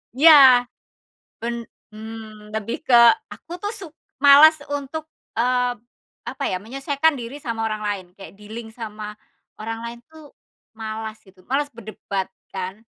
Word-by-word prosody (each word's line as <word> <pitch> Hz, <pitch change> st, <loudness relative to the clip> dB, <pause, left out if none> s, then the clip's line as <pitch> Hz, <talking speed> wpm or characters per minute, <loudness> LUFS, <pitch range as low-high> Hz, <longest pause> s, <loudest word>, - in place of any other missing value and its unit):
Iya. 265 Hz, -4 st, +8 dB, 0.7 s
Ben 235 Hz, +1 st, -3 dB, 0.4 s
mmm, 215 Hz, -1 st, -10 dB
lebih 220 Hz, +1 st, -3 dB
ke 255 Hz, -, +2 dB, 0.4 s
aku -, -, -17 dB
tuh 410 Hz, -, -2 dB
suk 380 Hz, -8 st, -10 dB, 0.3 s
malas 300 Hz, +3 st, +9 dB, 0.2 s
untuk 290 Hz, +2 st, -4 dB, 0.3 s
eee, 250 Hz, 0 st, +1 dB, 0.5 s
apa -, -, -6 dB
ya, 185 Hz, -, -1 dB
menyesuaikan 275 Hz, +7 st, 0 dB
diri 240 Hz, +3 st, -7 dB
sama 225 Hz, -2 st, -3 dB
orang 215 Hz, -1 st, -3 dB
lain, 200 Hz, -3 st, -2 dB
kayak 195 Hz, -4 st, -11 dB
dealing 220 Hz, +2 st, -9 dB
sama 215 Hz, -2 st, -7 dB, 0.5 s
orang 225 Hz, +1 st, -4 dB
lain 235 Hz, 0 st, -7 dB
tuh 315 Hz, -2 st, -15 dB, 0.4 s
malas 220 Hz, 0 st, -5 dB
gitu, 190 Hz, -1 st, -20 dB
malas 285 Hz, +2 st, 0 dB
berdebat 205 Hz, -4 st, -5 dB, 0.2 s
kan. 190 Hz, +3 st, -5 dB
230 Hz, 135 wpm, -22 LUFS, 215-275 Hz, 0.7 s, malas